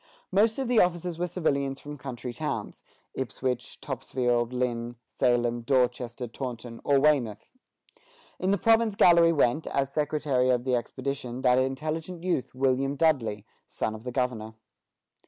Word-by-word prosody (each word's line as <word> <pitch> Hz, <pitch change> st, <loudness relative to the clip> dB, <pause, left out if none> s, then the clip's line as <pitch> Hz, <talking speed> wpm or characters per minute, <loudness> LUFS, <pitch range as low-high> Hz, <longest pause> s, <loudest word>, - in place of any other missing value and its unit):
Most 220 Hz, +2 st, +3 dB
of 270 Hz, -2 st, -2 dB
the 240 Hz, -2 st, +4 dB
officers 175 Hz, -1 st, +1 dB
were 175 Hz, -, 0 dB
civilians 140 Hz, -6 st, -1 dB
from 145 Hz, 0 st, -8 dB
country 125 Hz, -3 st, -6 dB
towns, -, -, -4 dB, 0.3 s
Ipswich, 125 Hz, -1 st, -3 dB
Topsfield, 120 Hz, -2 st, -1 dB
Lynn, 120 Hz, -1 st, -2 dB
Salem, 120 Hz, -1 st, +1 dB
Dorchester, 125 Hz, -1 st, 0 dB
Taunton, 120 Hz, -1 st, -7 dB
or 140 Hz, -1 st, +4 dB
Weymouth. 135 Hz, -8 st, +1 dB, 0.9 s
In 185 Hz, -, 0 dB
the 200 Hz, -, +3 dB
province 225 Hz, -1 st, +3 dB
galley 170 Hz, -3 st, +6 dB
went, 150 Hz, -1 st, +2 dB
as 140 Hz, 0 st, -1 dB
secretary 145 Hz, -4 st, +1 dB
of 125 Hz, -1 st, +2 dB
the 130 Hz, 0 st, 0 dB
expedition, 130 Hz, +1 st, -4 dB
that 125 Hz, 0 st, +5 dB
intelligent 155 Hz, +6 st, -3 dB
youth, 175 Hz, -9 st, -1 dB
William 135 Hz, +1 st, +1 dB
Dudley, 130 Hz, -10 st, +1 dB, 0.2 s
son 110 Hz, -, -3 dB
of 110 Hz, 0 st, -9 dB
the 125 Hz, -, -4 dB
governor. 120 Hz, -4 st, -2 dB
130 Hz, 140 wpm, -27 LUFS, 120-155 Hz, 0.9 s, galley